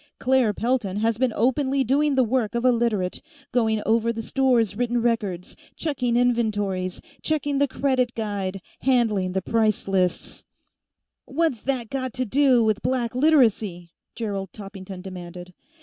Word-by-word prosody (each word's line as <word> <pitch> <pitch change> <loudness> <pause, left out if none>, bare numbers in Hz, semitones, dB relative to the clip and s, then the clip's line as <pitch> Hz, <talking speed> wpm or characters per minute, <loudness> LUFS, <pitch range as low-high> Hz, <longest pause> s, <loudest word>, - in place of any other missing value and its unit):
Claire 255 -4 +2
Pelton 220 -3 -1
has 225 +1 0
been 260 -2 +2
openly 265 +3 +1
doing 280 +3 +2
the 260 - +4
work 235 -2 0
of 235 +1 -1
a 255 - +6
Literate; 225 -6 0 0.3
going 220 -3 +1
over 230 +1 +2
the 225 0 -5
store's 245 -5 +2
written 240 +1 0
records, 210 -7 -1 0.2
checking 250 -6 -1
inventories, 205 -7 0 0.2
checking 290 -3 0
the 285 - +3
credit 255 -2 0
guide, 200 -4 -3 0.2
handling 220 -8 +1
the 190 -1 -1
price 220 -2 +1
lists 185 -2 -1 0.4
" - - -61
"What's 275 -5 0
that 255 -4 -2
got 260 -2 -3
to 255 0 -2
do 255 0 +4
with 215 -1 +1
Black 245 -3 -1
Literacy?" 225 - +2 0.2
Gerald 200 -4 -4
Toppington 195 -2 -9
demanded. 180 -1 -9
230 Hz, 150 wpm, -24 LUFS, 200-255 Hz, 0.4 s, a